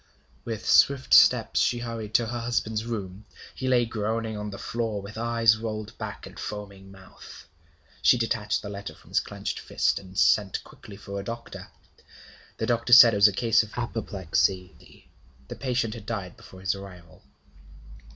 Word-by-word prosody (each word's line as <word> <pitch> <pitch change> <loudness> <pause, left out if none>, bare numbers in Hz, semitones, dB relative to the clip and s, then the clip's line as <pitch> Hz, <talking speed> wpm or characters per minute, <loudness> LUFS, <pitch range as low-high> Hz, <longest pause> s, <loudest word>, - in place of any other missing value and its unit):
With 110 -2 -5
swift 140 -2 +4
steps - - +6
she 120 - +2
hurried 115 -3 -6
to 120 - +4
her 120 +2 -4
husband's 115 -2 -2
room. 105 -3 -6 0.3
He 130 - -5
lay 125 -2 +3
groaning 110 0 -3
on 105 0 -5
the 100 - -8
floor, 115 -2 -3
with 100 +2 -10
eyes 115 -1 +2
rolled 110 -2 -5
back - - -6
and - - -12
foaming 100 -2 -8
mouth. 95 -1 -14 0.6
She - - +5
detached 110 -2 -1
the 100 - -6
letter 100 -1 -7
from - - -20
his - - +3
clenched - - -5
fist, - - 0
and 95 0 -13
sent 100 -3 +2
quickly 100 - -14
for 100 -1 -7
a - - -6
doctor. 115 +3 -8 0.9
The 110 - -2
doctor 120 +1 +1
said 120 -2 +10
it - - 0
was 100 +1 +7
a - - +1
case 115 +2 +3
of 110 +1 -9
apoplexy. 95 -5 -2 0.4
The - - -6
patient 125 -4 -1
had 110 -2 -10
died 100 -6 -5
before 95 - -14
his 95 0 0
arrival. 95 -3 -12
110 Hz, 170 wpm, -26 LUFS, 100-115 Hz, 0.9 s, said